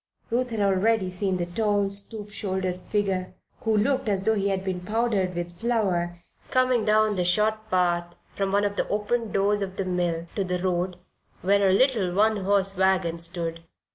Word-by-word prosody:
Ruth 250 +2 +1
had 225 -3 -2
already 195 0 +2
seen 185 0 -1
the 175 - -1
tall, 205 +2 0
stoop 205 +1 -6
shouldered 185 -3 -2
figure, 195 -3 -1 0.2
who 220 -1 +1
looked 260 +2 +1
as 195 -2 0
though 220 - +3
he 200 -2 0
had 190 -1 -1
been 185 -2 -2
powdered 210 -2 0
with 175 0 -5
flour, 190 -7 0 0.3
coming 255 -2 +2
down 215 0 +3
the 180 - +1
short 215 +4 +1
path 175 -2 +1 0.2
from 195 -1 -1
one 200 +1 +2
of 205 0 -2
the - - 0
open 215 +2 -1
doors 205 +1 +1
of 190 -1 -4
the 195 - -2
mill 175 -2 -1
to 200 - 0
the 180 -1 -1
road, 180 0 -1 0.5
where 200 +1 +4
a - - +4
little, 210 -3 +3
one 215 +2 +3
horse 195 0 +1
wagon 185 -3 +1
stood. 165 -1 -1
195 Hz, 185 wpm, -25 LUFS, 180-215 Hz, 0.5 s, where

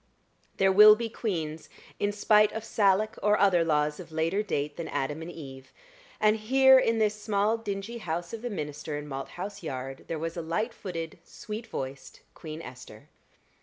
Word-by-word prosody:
There 195 0 +4
will 210 +2 +9
be 230 +1 -4
queens 165 -9 -4 0.3
in 205 - +1
spite 210 0 +4
of 220 - -4
Salic 215 0 +1
or 210 +1 +3
other 185 -4 +4
laws 150 -2 +1
of 170 -3 -10
later 165 +5 0
date 145 -8 -2
than 170 - -5
Adam 145 +4 -3
and 165 - -6
Eve; 135 -6 -10 0.5
and 215 0 +4
here 265 +4 +6
in 230 -2 +1
this 215 -1 0
small 210 +1 +1
dingy 225 +1 -5
house 170 -2 -4
of 225 - -5
the 245 - -3
minister 150 -5 -5
in 150 0 -7
Malthouse 150 +8 -6
Yard, 135 -4 -6
there 165 - -3
was 165 +1 -4
a 170 - -3
light 215 +9 -2
footed, 165 -6 -6
sweet 220 +2 -8
voiced 135 - -7
Queen 160 0 -8
Esther. 125 0 -12
185 Hz, 175 wpm, -28 LUFS, 155-215 Hz, 0.5 s, will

